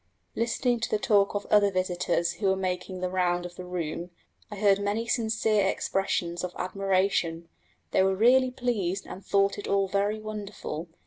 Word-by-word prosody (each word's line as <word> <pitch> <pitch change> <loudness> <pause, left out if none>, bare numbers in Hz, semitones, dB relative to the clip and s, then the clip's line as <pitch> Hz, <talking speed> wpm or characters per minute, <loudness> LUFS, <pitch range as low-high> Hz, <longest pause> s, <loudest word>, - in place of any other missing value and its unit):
Listening 235 +1 0
to 225 - -2
the - - +1
talk 205 -1 +2
of 205 - -2
other 205 -1 +5
visitors 180 -2 0
who 205 - -2
were 190 - +3
making 185 0 -3
the 185 - -1
round 175 -1 +1
of 175 0 -8
the 180 - -7
room, 175 -1 -4 0.4
I 210 - -7
heard 200 -1 +3
many 205 +3 -1
sincere 220 -3 +1
expressions 175 -3 -1
of 180 -1 -4
admiration: 185 -3 0 0.4
they - - +3
were 190 0 +3
really 255 +5 +5
pleased 215 -7 -2
and 190 - -9
thought 200 0 +2
it - - -6
all 195 -1 +2
very 200 +2 0
wonderful. 205 -6 -6
195 Hz, 175 wpm, -27 LUFS, 180-210 Hz, 0.4 s, other